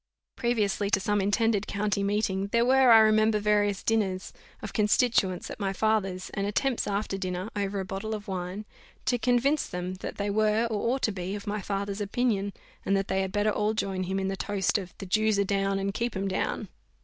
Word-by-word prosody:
Previously 215 -4 0
to 195 - +3
some 205 +1 +1
intended 210 +1 +1
county 200 0 -1
meeting, 200 -1 0
there 235 +3 +2
were, 260 0 +5
I 225 - +9
remember, 215 0 +4
various 205 -1 +1
dinners 195 -5 0 0.3
of 210 - -6
constituents 210 -4 +2
at - - -8
my 195 -2 -1
father's, 195 -4 0
and 200 0 -2
attempts 245 +4 0
after 200 -1 -2
dinner, 185 +1 -3
over 200 -1 -1
a 190 - -3
bottle 200 +3 -4
of 210 -1 -8
wine, 185 +2 -4 0.4
to 245 -1 +1
convince 250 +6 +2
them, 180 +1 -4
that - - -5
they 205 0 -1
were, 215 +2 +2
or 215 +1 0
ought 270 - -6
to 220 - +2
be, 190 0 -4
of 205 - -7
my 210 0 -2
father's 200 +1 -3
opinion, 205 -1 0 0.3
and 195 - +2
that 195 - -2
they 190 0 +1
had 190 -1 -2
better 205 +1 +1
all 210 +1 0
join 190 -3 -2
him 190 +2 -1
in 190 - -1
the 195 - -1
toast 200 0 0
of 180 -2 -8
"The 195 - -7
Jews 215 +2 +2
are 200 - +3
down, 195 0 0
and 195 0 -2
keep 235 +1 -2
'em 195 +1 -1
down." 190 - -2
205 Hz, 210 wpm, -28 LUFS, 195-215 Hz, 0.4 s, I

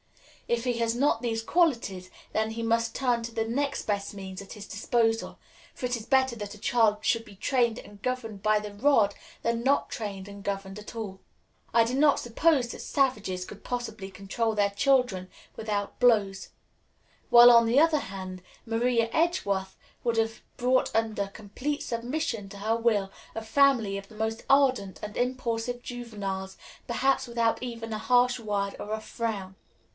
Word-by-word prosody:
If 235 -1 0
he 245 -2 0
has 230 0 +1
not 245 -3 +2
these 225 -2 -1
qualities, 230 - +1 0.2
then 220 0 0
he 230 +1 -4
must 230 0 +1
turn 245 -3 +1
to 230 0 -6
the 225 0 0
next 280 +4 -1
best 200 -1 -2
means 190 -1 -7
at 195 - -12
his 210 -2 -9
disposal; 225 +2 0 0.4
for 255 - -5
it 250 0 0
is 225 -2 -7
better 265 -2 +3
that 205 -1 -6
a - - -13
child 215 -1 +2
should 230 -1 +2
be 210 -3 -14
trained 235 +2 +1
and 205 -1 -13
governed 225 -5 -3
by 215 0 +4
the 210 -1 -7
rod 215 -3 +3 0.3
than 230 0 0
not 275 +2 +2
trained 200 -3 -5
and 200 0 -10
governed 195 -1 -4
at 210 - -10
all. 205 -4 -6 0.5
I 230 -1 +5
do 240 - -2
not 285 +2 +4
suppose 255 +2 +2
that - - -7
savages 210 -10 0
could 210 - -11
possibly 225 -6 -4
control 210 +4 -2
their 200 -1 +2
children 245 -5 +2 0.3
without 205 -2 -3
blows; 205 -6 +3 0.8
while, 240 0 +10
on 235 -1 +7
the 235 +4 +4
other 320 -1 +4
hand, 185 -1 -7 0.2
Maria 230 0 +1
Edgeworth 200 - 0 0.3
would 235 -1 0
have 225 0 0 0.2
brought 255 +1 +2
under 220 -3 0
complete 220 +9 -4
submission 235 -3 -3
to 200 - -10
her 215 +3 0
will 220 -4 +1 0.3
a 225 - -3
family 225 -4 +3
of 200 0 -9
the 220 - -14
most 220 +1 -2
ardent 260 -9 +3
and 210 0 -6
impulsive 245 -1 -1
juveniles, 205 -6 -5 0.3
perhaps 265 +3 +1
without 235 -1 +1
even 230 -2 -5
a 215 - -3
harsh 245 +1 +3
word 205 -3 -2
or 210 - -6
a 220 - -1
frown. 215 -4 -4
225 Hz, 175 wpm, -28 LUFS, 205-245 Hz, 0.8 s, while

